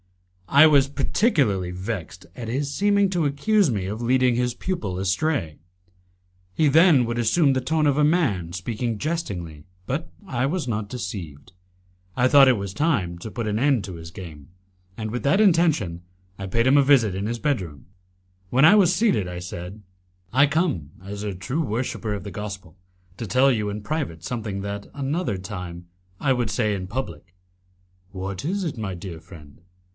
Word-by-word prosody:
I 140 +3 +8
was 140 -3 +4
particularly 140 - +1
vexed 95 -2 -6
at 115 -3 -6
his 140 +4 -2
seeming 200 +1 +3
to 175 -4 +1
accuse 190 +7 +2
me 100 -5 -2
of 105 +4 -4
leading 125 0 +3
his 125 0 0
pupil 110 - -3
astray. 95 - -1 0.9
He 155 - +2
then 155 -3 +5
would 120 +1 -2
assume 135 +5 +3
the 130 - 0
tone 155 +4 +1
of 140 -1 +2
a - - +4
man 135 - +1
speaking 110 +5 -3
jestingly, 95 - -4 0.2
but 155 +8 -3 0.2
I 125 -2 0
was 165 -2 -2
not 105 -3 -2
deceived. 90 - -7 0.6
I 125 - +4
thought 135 0 +7
it 125 - +3
was 100 -1 -5
time 105 - 0
to 110 - -7
put 115 -3 -4
an 105 +1 0
end 135 -4 +2
to 95 - -7
his 80 0 -9
game, 80 -6 -10 0.5
and 110 -1 -4
with 125 - -4
that 140 +8 +3
intention 160 - +3 0.4
I 95 - -5
paid 115 +5 +1
him 135 +2 +5
a 140 - +6
visit 125 -9 +4
in 100 +2 -2
his 120 +1 -3
bedroom. 95 - -2 0.6
When 130 +7 +4
I 205 - +8
was 185 -4 +5
seated, 185 - +2
I 90 0 -6
said, 90 +3 -8 0.5
"I 140 +3 +5
come, 145 - 0
as 100 +1 -7
a 105 -2 -3
true 125 - -2
worshipper 115 -4 -2
of 100 -3 -5
the 100 - -6
Gospel, 95 -4 -7 0.4
to 115 - -4
tell 130 +5 +4
you 105 -4 -1
in 105 +1 -5
private 105 - -3
something 105 -1 -4
that, 100 0 -5
another 140 - -2
time, 90 -3 -7 0.3
I 135 -2 +2
would 120 -3 -1
say 105 +1 0
in 95 -2 -4
public." 90 - -6 0.8
"What 95 0 -5
is 190 +5 -1
it, 150 -7 -4
my 100 -4 -4
dear 85 -2 -8
friend?" 75 -4 -15
115 Hz, 180 wpm, -24 LUFS, 95-145 Hz, 0.9 s, I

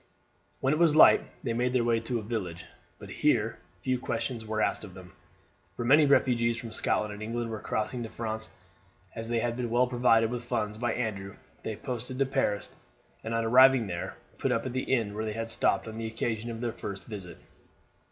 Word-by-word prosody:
When 135 +2 +2
it 155 - 0
was 165 -3 +5
light 155 - +8 0.2
they 120 -5 -1
made 125 +2 0
their 125 -2 +3
way 115 -1 +2
to 115 +2 -2
a 110 - -4
village; 100 -7 -4 0.4
here - - +1
but 90 +2 -32
few 130 -1 0
questions 115 -1 -3
were 110 0 -3
asked - - +1
them, 90 -1 -12 0.6
for 120 - -3
many 145 +4 +6
refugees 120 -4 +3
from 115 -2 -7
Scotland 105 -1 0
and 105 - -9
England 115 +1 -3
were 110 - -4
crossing 110 +3 -2
to 115 - -5
France. 110 -1 -4 0.7
As 115 0 -4
they 120 - +1
had 115 +1 0
been 120 -1 -2
well 120 +2 +3
provided 120 -2 +3
with 125 -1 -4
funds 110 -3 -2
by 120 -1 0
Andrew 100 -4 -3 0.3
they 110 - -4
posted 125 +3 -5
to 135 - +3
Paris, 105 -6 -1 0.5
and 115 +1 -2
on 115 0 0
arriving 130 +1 +6
there 85 -3 -5 0.2
put - - 0
up 115 - 0
at 130 - -3
the 130 0 -2
inn 115 -6 +1
where 110 +1 -3
they 110 - -3
had 115 +1 -3
stopped - - +1
on 110 0 -6
the 115 - -3
occasion 110 0 -3
of 115 0 -5
their 120 -2 -2
first 100 -4 -6
visit. 100 -5 -7
115 Hz, 210 wpm, -29 LUFS, 110-125 Hz, 0.7 s, light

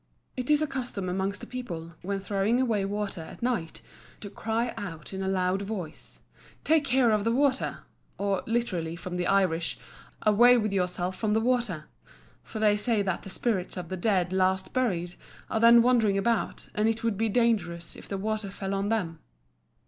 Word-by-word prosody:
It 250 +1 -4
is 300 0 +5
a - - 0
custom 245 -8 -4
amongst 190 +2 -2
the - - -6
people, 170 -10 -6
when 195 +2 -2
throwing 200 +5 +1
away 220 -6 +1
water 200 -3 -3
at 160 - -10
night, 225 -10 -2 0.4
to 205 - -7
cry 225 +3 -1
out 165 -3 -7
in 190 - -4
a 190 - -2
loud 190 0 +1
voice, 195 -6 -7 0.4
"Take 315 -2 +3
care 250 -3 +3
of 210 -1 +2
the 230 - +1
water;" 270 +1 +1 0.4
or 200 -1 0
literally, 185 -9 -1
from 180 +1 -6
the 180 - -1
Irish, 185 -4 +1 0.5
"Away 240 +4 +6
with 215 -3 0
yourself 180 -1 -1
from 215 0 0
the 220 - +3
water" 230 -9 0 0.6
for - - -8
they 210 -1 +3
say 210 -1 +1
that 190 -3 -1
the - - -9
spirits 190 -3 -1
of 175 -2 -5
the 185 - -2
dead 185 -2 +1
last 190 0 +1
buried 180 -9 0 0.4
are 220 - +1
then 235 +1 +8
wandering 230 -5 +3
about, 230 +3 -1
and 215 +1 +2
it 225 0 -2
would 230 -3 +1
be 225 +3 0
dangerous 200 -7 0
if - - -12
the 195 - -2
water 215 0 -2
fell 195 0 -4
on 195 +1 -1
them. 180 -8 -1
200 Hz, 185 wpm, -28 LUFS, 185-230 Hz, 0.6 s, then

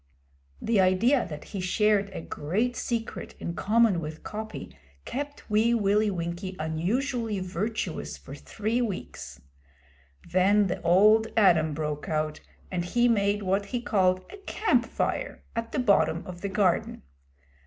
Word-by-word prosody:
The 225 -2 +1
idea 195 +9 +3
that 150 -2 -7
he 195 - -6
shared 200 +2 +2
a 190 - -6
great 210 +13 -2
secret 230 -2 -4
in 170 - -4
common 215 -1 +3
with 155 0 -7
Coppy 215 +1 -7 0.3
kept 285 +2 -5
Wee 220 +2 +3
Willie 210 0 +2
Winkie 175 +1 -4
unusually 210 - -1
virtuous 190 +5 -3
for - - -11
three 225 +3 -2
weeks. 215 -6 -5 0.9
Then 200 +3 +4
the 180 - -3
Old 210 +6 +5
Adam 160 -7 +4
broke 150 -1 -3
out, 155 -1 -1 0.3
and 180 -2 -1
he 240 +7 +2
made 205 -2 +2
what 195 +2 0
he 245 - -2
called 185 -5 +1
a 410 - -9
'camp 390 - +1
fire' - - -2
at 230 0 -3
the - - -3
bottom 200 -8 +2
of 175 -1 -9
the 200 - -2
garden. 190 - +1
200 Hz, 145 wpm, -27 LUFS, 180-225 Hz, 0.9 s, Old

